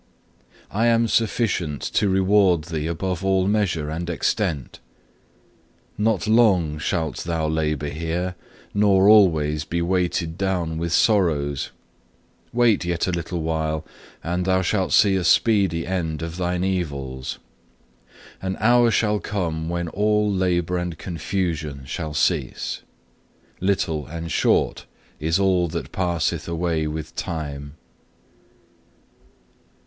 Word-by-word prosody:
I 115 Hz, +4 st, +1 dB
am 115 Hz, 0 st, +3 dB
sufficient 100 Hz, -, 0 dB
to 105 Hz, -, +2 dB
reward 95 Hz, -3 st, +3 dB
thee 80 Hz, -1 st, -3 dB
above 90 Hz, +2 st, -3 dB
all 95 Hz, -1 st, +2 dB
measure 90 Hz, -8 st, 0 dB
and 85 Hz, +2 st, -4 dB
extent. 85 Hz, -3 st, -1 dB, 1.2 s
Not 105 Hz, -1 st, +1 dB
long 95 Hz, -9 st, +3 dB
shalt 80 Hz, 0 st, -2 dB
thou 80 Hz, -2 st, -2 dB
labour 75 Hz, -2 st, -1 dB
here, 85 Hz, +4 st, -3 dB, 0.4 s
nor 100 Hz, -1 st, +4 dB
always 80 Hz, -8 st, +5 dB
be 85 Hz, +2 st, -3 dB
weighed 85 Hz, -1 st, -1 dB
down 90 Hz, -5 st, -1 dB
with 85 Hz, 0 st, -2 dB
sorrows. 80 Hz, -, +2 dB, 0.8 s
Wait 115 Hz, -5 st, +3 dB
yet 85 Hz, -1 st, -1 dB
a 90 Hz, -, -1 dB
little 85 Hz, 0 st, -3 dB
while, 80 Hz, -1 st, -1 dB, 0.4 s
and 90 Hz, +2 st, -1 dB
thou 95 Hz, 0 st, +2 dB
shalt 95 Hz, +1 st, 0 dB
see 100 Hz, -2 st, +5 dB
a 95 Hz, -, 0 dB
speedy 90 Hz, -2 st, +3 dB
end 80 Hz, -4 st, -2 dB
of 85 Hz, +1 st, -5 dB
thine 90 Hz, 0 st, -1 dB
evils. 70 Hz, -9 st, -3 dB, 1.0 s
An 95 Hz, 0 st, -3 dB
hour 120 Hz, +1 st, +5 dB
shall 105 Hz, -2 st, +1 dB
come 85 Hz, -7 st, -3 dB
when 85 Hz, 0 st, -2 dB
all 105 Hz, +2 st, +1 dB
labour 90 Hz, -1 st, 0 dB
and 90 Hz, -2 st, -4 dB
confusion 80 Hz, -5 st, -3 dB
shall 75 Hz, +2 st, -5 dB
cease. 75 Hz, -5 st, -1 dB, 0.8 s
Little 85 Hz, -6 st, 0 dB
and 85 Hz, 0 st, -6 dB
short -, -, +1 dB, 0.3 s
is 80 Hz, +3 st, +1 dB
all 95 Hz, -3 st, +2 dB
that 85 Hz, +1 st, -5 dB
passeth 90 Hz, -3 st, -1 dB
away 85 Hz, -2 st, -1 dB
with 75 Hz, 0 st, -6 dB
time. 70 Hz, -3 st, -5 dB
85 Hz, 120 wpm, -23 LUFS, 80-95 Hz, 1.2 s, always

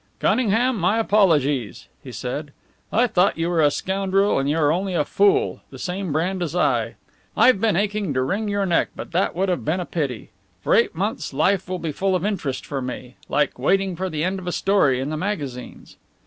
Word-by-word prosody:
"Cunningham, 245 Hz, +1 st, +2 dB
my 185 Hz, +4 st, +1 dB
apologies," 150 Hz, -, +1 dB, 0.2 s
he 130 Hz, -, -9 dB
said. 140 Hz, +4 st, -5 dB, 0.4 s
"I 235 Hz, +4 st, +3 dB
thought 185 Hz, -6 st, +2 dB
you 165 Hz, +1 st, -1 dB
were 165 Hz, -2 st, +2 dB
a 145 Hz, -, +5 dB
scoundrel, 195 Hz, +3 st, 0 dB
and 135 Hz, +1 st, 0 dB
you 150 Hz, -, +1 dB
are 150 Hz, -2 st, +3 dB
only 185 Hz, +2 st, -1 dB
a 150 Hz, -, +1 dB
fool 410 Hz, -, +2 dB
the -, -, -11 dB
same 185 Hz, -1 st, -4 dB
brand 180 Hz, +5 st, -1 dB
as 170 Hz, -1 st, -3 dB
I! 180 Hz, -, +1 dB, 0.4 s
I've 250 Hz, -6 st, +5 dB
been 225 Hz, -4 st, +2 dB
aching 205 Hz, -2 st, -1 dB
to 130 Hz, -, +1 dB
wring 200 Hz, +10 st, -1 dB
your 200 Hz, -1 st, 0 dB
neck, 175 Hz, -3 st, +2 dB
but -, -, -8 dB
that 175 Hz, +1 st, 0 dB
would 190 Hz, +3 st, 0 dB
have 180 Hz, -, -1 dB
been 160 Hz, +5 st, 0 dB
a 180 Hz, -, -3 dB
pity. 140 Hz, -12 st, -4 dB, 0.3 s
For -, -, +1 dB
eight 230 Hz, -, +3 dB
months 200 Hz, -2 st, -3 dB
life 185 Hz, +5 st, +1 dB
will 185 Hz, -, -2 dB
be 165 Hz, -3 st, -4 dB
full 190 Hz, +5 st, 0 dB
of 180 Hz, +1 st, -1 dB
interest 165 Hz, -11 st, -2 dB
for 140 Hz, -2 st, -4 dB
me 125 Hz, 0 st, -7 dB
like 145 Hz, -2 st, 0 dB
waiting 190 Hz, +6 st, +1 dB
for 185 Hz, +2 st, -3 dB
the 155 Hz, -2 st, -2 dB
end 190 Hz, +2 st, -1 dB
of 180 Hz, -, -9 dB
a -, -, 0 dB
story 175 Hz, -10 st, +2 dB
in 135 Hz, +3 st, -3 dB
the 155 Hz, -, -2 dB
magazines." 145 Hz, -10 st, -5 dB
180 Hz, 215 wpm, -22 LUFS, 145-195 Hz, 0.4 s, a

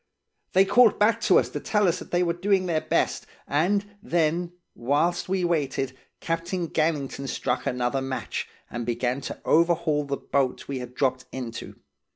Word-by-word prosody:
They 190 Hz, +1 st, +6 dB
called 220 Hz, +3 st, +5 dB
back 210 Hz, +2 st, +3 dB
to -, -, +5 dB
us -, -, +2 dB
to -, -, -4 dB
tell 210 Hz, -2 st, +1 dB
us 170 Hz, -, +1 dB
they 175 Hz, 0 st, 0 dB
were 170 Hz, -1 st, +1 dB
doing 190 Hz, +2 st, +1 dB
their 165 Hz, -3 st, 0 dB
best, -, -, 0 dB, 0.2 s
and 190 Hz, +8 st, +1 dB, 0.2 s
then, 170 Hz, -3 st, 0 dB, 0.2 s
whilst 150 Hz, +9 st, 0 dB
we 185 Hz, -1 st, +1 dB
waited, 135 Hz, -6 st, -1 dB, 0.2 s
Captain 170 Hz, +1 st, -2 dB
Gannington 145 Hz, -4 st, -1 dB
struck 125 Hz, +1 st, -2 dB
another 125 Hz, +2 st, 0 dB
match, 130 Hz, 0 st, -3 dB, 0.2 s
and 120 Hz, -, -3 dB
began 120 Hz, +3 st, -1 dB
to -, -, -6 dB
overhaul 165 Hz, -2 st, +3 dB
the 140 Hz, 0 st, -2 dB
boat 135 Hz, -2 st, -1 dB
we 135 Hz, -2 st, -3 dB
had 125 Hz, 0 st, -8 dB
dropped 130 Hz, -2 st, 0 dB
into. 120 Hz, -3 st, -6 dB
155 Hz, 165 wpm, -26 LUFS, 130-175 Hz, 0.2 s, They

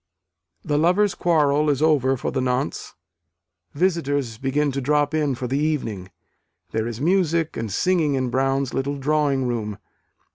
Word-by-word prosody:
The 145 Hz, 0 st, +1 dB
lovers' 185 Hz, +5 st, +3 dB
quarrel 150 Hz, -3 st, +2 dB
is 140 Hz, -2 st, +1 dB
over 140 Hz, -4 st, +2 dB
for -, -, -3 dB
the 130 Hz, -, -1 dB
nonce. 125 Hz, +2 st, -2 dB, 0.8 s
Visitors 145 Hz, -9 st, 0 dB
begin 140 Hz, +2 st, 0 dB
to 135 Hz, +1 st, -3 dB
drop 145 Hz, +2 st, +1 dB
in 150 Hz, -4 st, +1 dB
for 125 Hz, -, -5 dB
the 135 Hz, +3 st, -1 dB
evening; 115 Hz, -12 st, -2 dB, 0.6 s
there 110 Hz, 0 st, -1 dB
is 115 Hz, -1 st, -5 dB
music 170 Hz, 0 st, +1 dB
and 110 Hz, -2 st, -4 dB
singing 160 Hz, -, +1 dB
in 130 Hz, -2 st, -1 dB
Brown's 135 Hz, 0 st, 0 dB
little 140 Hz, +1 st, -2 dB
drawing 140 Hz, -2 st, +1 dB
room. 110 Hz, -4 st, -3 dB
140 Hz, 150 wpm, -23 LUFS, 130-155 Hz, 0.8 s, lovers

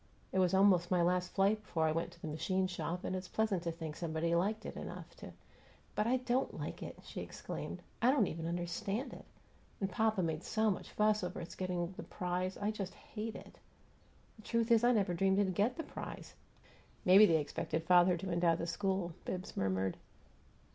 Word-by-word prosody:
It 190 Hz, -, +1 dB
was 185 Hz, 0 st, +3 dB
almost 190 Hz, -3 st, +5 dB
my 180 Hz, -2 st, +3 dB
last 180 Hz, +1 st, +1 dB
flight 205 Hz, +2 st, +2 dB
before 165 Hz, -6 st, -1 dB
I 155 Hz, -, +3 dB
went 165 Hz, +2 st, -1 dB
to -, -, -19 dB
the -, -, -3 dB
machine 185 Hz, +5 st, 0 dB
shop, 175 Hz, 0 st, -3 dB
and 185 Hz, -, -2 dB
it's 185 Hz, 0 st, -4 dB
pleasant 215 Hz, -5 st, 0 dB
to 170 Hz, -1 st, -2 dB
think 160 Hz, -2 st, -6 dB
somebody 165 Hz, 0 st, -1 dB
liked 210 Hz, +6 st, +1 dB
it -, -, -5 dB
enough -, -, -7 dB
to -, -, -9 dB, 0.3 s
" -, -, -28 dB
"But 210 Hz, -, +1 dB
I 255 Hz, +2 st, +3 dB
DON'T 255 Hz, +1 st, -1 dB
like -, -, -5 dB
it!" -, -, -7 dB
she -, -, -6 dB
exclaimed. -, -, -6 dB, 0.2 s
"I 240 Hz, -, +5 dB
don't 260 Hz, -6 st, +4 dB
even 165 Hz, -2 st, -4 dB
understand 195 Hz, +8 st, -2 dB
it -, -, -11 dB, 0.5 s
and 195 Hz, -1 st, -1 dB
papa 220 Hz, -1 st, +2 dB
made 160 Hz, 0 st, -2 dB
so 220 Hz, -1 st, +2 dB
much 190 Hz, -, -5 dB
fuss 210 Hz, -1 st, +2 dB
over 180 Hz, 0 st, -3 dB
its 170 Hz, -, -7 dB
getting 180 Hz, -1 st, -2 dB
the -, -, -4 dB
prize, 180 Hz, +1 st, -2 dB
I 205 Hz, +1 st, 0 dB
just 195 Hz, -3 st, -5 dB
hate 220 Hz, 0 st, -6 dB
it! -, -, -11 dB, 0.8 s
The -, -, -13 dB
truth 230 Hz, +1 st, 0 dB
is 230 Hz, 0 st, +6 dB
I 240 Hz, -, +6 dB
never 200 Hz, -6 st, +2 dB
dreamed 190 Hz, +2 st, +2 dB
it'd 195 Hz, -2 st, +2 dB
get 215 Hz, +7 st, +1 dB
the 325 Hz, -, -3 dB
prize." -, -, -8 dB, 0.7 s
"Maybe 195 Hz, +3 st, +9 dB
they 165 Hz, -, +4 dB
expected 155 Hz, +2 st, -2 dB
father 175 Hz, +1 st, +5 dB
to 185 Hz, +2 st, -4 dB
endow 170 Hz, -1 st, +3 dB
the 165 Hz, -, -3 dB
school," 190 Hz, 0 st, -1 dB
Bibbs 185 Hz, +2 st, -5 dB
murmured. 95 Hz, -1 st, 0 dB
185 Hz, 205 wpm, -35 LUFS, 170-210 Hz, 0.8 s, Maybe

